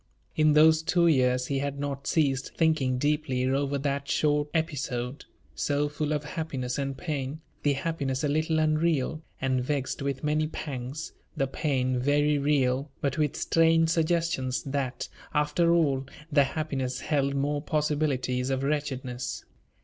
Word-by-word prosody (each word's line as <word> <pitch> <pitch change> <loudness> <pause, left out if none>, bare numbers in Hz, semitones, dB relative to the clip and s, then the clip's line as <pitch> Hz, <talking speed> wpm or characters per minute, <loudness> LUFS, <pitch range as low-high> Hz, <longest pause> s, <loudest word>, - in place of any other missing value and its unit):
In 155 -1 +4
those 160 +1 +6
two 170 +1 +2
years 125 -5 +3
he 135 +1 -1
had 140 0 -3
not 140 -1 -4
ceased 135 -4 +1
thinking 155 -6 +2
deeply 145 -2 0
over 140 +1 0
that 140 0 -2
short 150 0 +2
episode, 140 -5 -2 0.3
so 145 0 0
full 150 0 -2
of 150 -1 0
happiness 145 -6 -3
and 135 -1 -2
pain 150 -2 -4 0.2
the 145 - +2
happiness 140 -3 -2
a - - +2
little 155 +2 +1
unreal, 155 -1 +1 0.2
and 130 -1 0
vexed 140 0 -2
with 140 0 -2
many 155 +1 +1
pangs; 140 0 -5 0.2
the 135 - +2
pain 130 -2 0
very 145 +2 +2
real, 140 -1 +1
but 140 +1 -1
with 150 -2 +1
strange 165 0 +3
suggestions 165 -5 0
that, 135 -2 -3 0.3
after 150 +3 +2
all, 140 -6 +2 0.2
the 140 -1 +5
happiness 135 -4 -3
held 140 -2 0
more 145 +1 0
possibilities 145 -5 0
of 135 0 -1
wretchedness. 135 -4 -3
145 Hz, 145 wpm, -28 LUFS, 135-155 Hz, 0.3 s, those